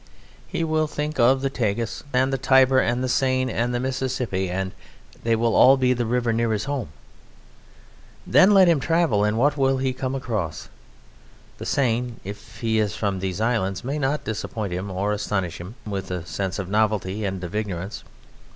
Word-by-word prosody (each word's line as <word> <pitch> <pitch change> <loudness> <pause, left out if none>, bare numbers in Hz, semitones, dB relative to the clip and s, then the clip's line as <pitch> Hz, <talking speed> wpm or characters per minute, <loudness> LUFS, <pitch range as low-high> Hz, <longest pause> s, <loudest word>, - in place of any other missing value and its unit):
He 165 - -2
will 155 -1 +1
think 150 0 -4
of 130 +3 +4
the 135 - 0
Tagus 115 -3 -2
and 130 +1 +2
the - - +1
Tiber 130 0 +5
and 120 +1 0
the - - 0
Seine 130 -1 +1
and 120 +2 0
the 120 - -1
Mississippi 130 -7 -2
and 95 +1 -2 0.5
they 115 0 +2
will 115 0 +1
all 135 +1 +7
be 130 -1 +3
the 120 -2 -2
river 120 -1 +1
near 115 0 +1
his 105 0 -1
home. 140 -3 -3 1.4
Then 190 - +6
let 195 -3 +7
him 165 -4 +4
travel, 160 -8 +2
and 105 +1 +1
what 145 +5 +2
will 135 -1 +2
he 130 0 0
come 130 +1 -3
across? 110 - -3 0.9
The - - -5
Seine, 125 -3 0
if 100 +2 -10
he 110 -1 +1
is 105 -4 0
from 100 -3 -1
these 95 0 -3
islands, 110 -5 0
may 140 +4 -2
not 140 +1 0
disappoint 110 -3 -4
him 95 +3 -4
or 100 +3 -1
astonish 100 -4 -2
him 95 +7 -9
with 95 -3 -4
a 90 -2 -4
sense 95 +1 -3
of 95 -3 -4
novelty 105 -1 0
and 95 -2 -3
of 90 - -6
ignorance. 95 - -4
115 Hz, 190 wpm, -23 LUFS, 100-130 Hz, 1.4 s, all